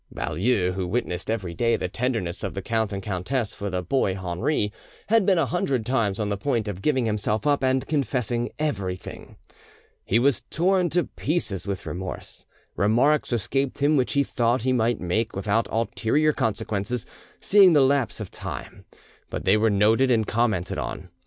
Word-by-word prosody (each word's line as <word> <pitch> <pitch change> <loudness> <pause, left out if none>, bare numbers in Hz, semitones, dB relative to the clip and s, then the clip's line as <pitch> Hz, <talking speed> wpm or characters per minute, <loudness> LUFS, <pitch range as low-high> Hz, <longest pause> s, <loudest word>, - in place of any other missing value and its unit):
Baulieu, 90 +2 0
who 95 -1 -3
witnessed 90 -3 -2
every 100 -6 -2
day 115 +6 +2
the - - -2
tenderness 110 -5 -2
of 95 - -4
the 95 - -4
count 110 -1 0
and 100 -1 -4
countess 105 +4 -2
for 100 -1 -4
the 90 -1 -2
boy 95 -1 +1
Henri, 105 - -1 0.4
had 225 -3 +4
been 190 -3 +4
a 165 - +3
hundred 125 -1 -1
times 115 -6 0
on 105 -1 -1
the 100 - -1
point 115 -1 -1
of 95 -2 -5
giving 130 -1 +1
himself 105 +2 -1
up 145 -2 +2
and 130 0 +1
confessing 125 -5 -1
everything. 100 -12 -4 0.7
He 110 - +2
was 130 +1 +2
torn 180 +1 +2
to 175 +2 +1
pieces 130 - -2
with 100 -2 -4
remorse. 90 +1 -7 0.3
Remarks 120 +11 +2
escaped 130 +4 -1
him 145 +2 +3
which 130 -3 +1
he 140 -1 +3
thought 120 -2 0
he 130 0 +2
might 120 -1 +1
make 105 +6 -1
without 100 +3 0
ulterior 115 +6 +1
consequences; 105 +1 -2 0.3
seeing 195 -3 +6
the 145 - +5
lapse 135 -4 +2
of 105 - -6
time, - - -8 0.4
but - - -5
they 95 - +5
were 110 +1 +3
noted 110 +6 +3
and 115 -3 +3
commented 110 -6 0
on. - - -5
115 Hz, 175 wpm, -25 LUFS, 100-135 Hz, 0.7 s, seeing